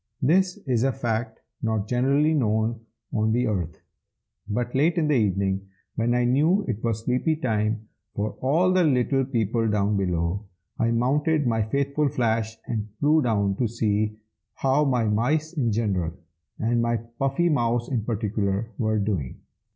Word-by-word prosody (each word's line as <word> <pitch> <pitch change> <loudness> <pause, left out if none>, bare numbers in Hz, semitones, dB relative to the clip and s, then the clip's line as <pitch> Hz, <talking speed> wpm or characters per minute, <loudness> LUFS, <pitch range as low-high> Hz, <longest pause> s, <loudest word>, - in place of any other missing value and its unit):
This 180 +6 +3
is 125 -5 +1
a 135 +2 +2
fact 115 -3 -3 0.2
not 110 -2 -1
generally 140 +6 +2
known 110 -4 +1 0.3
on 110 0 +1
the 125 +2 +2
earth.) 90 -8 -3 0.7
But 120 +3 -2
late 155 +6 +2
in 160 -3 +2
the 150 - +2
evening, 100 -4 +1 0.3
when 120 +1 +1
I 125 0 +2
knew 155 +11 +3
it 115 -4 -3
was 115 -2 -1
sleepy 125 +6 +1
time 110 -5 -1 0.3
for 105 +1 -1
all 165 +8 +3
the 185 -1 +4
little 135 -2 +2
people 115 -3 0
down 105 0 +1
below, 90 +1 -1 0.3
I 115 - +2
mounted 145 +6 +1
my 115 -2 +1
faithful 140 +6 0
Flash, 110 -3 -1
and 110 -3 -3
flew 155 +2 +4
down 100 -6 +1
to 120 - +1
see 105 -1 -1 0.4
how 135 +3 +2
my 125 -4 +2
mice 140 +10 0
in 130 -8 0
general, 100 -7 0 0.4
and 115 +1 +1
my 115 0 +1 0.2
Puffy 135 +6 +1
mouse 120 -5 +1
in 120 -5 -1
particular, 105 -1 -1
were 110 -1 +1
doing. 100 -11 -2
115 Hz, 160 wpm, -25 LUFS, 105-135 Hz, 0.7 s, the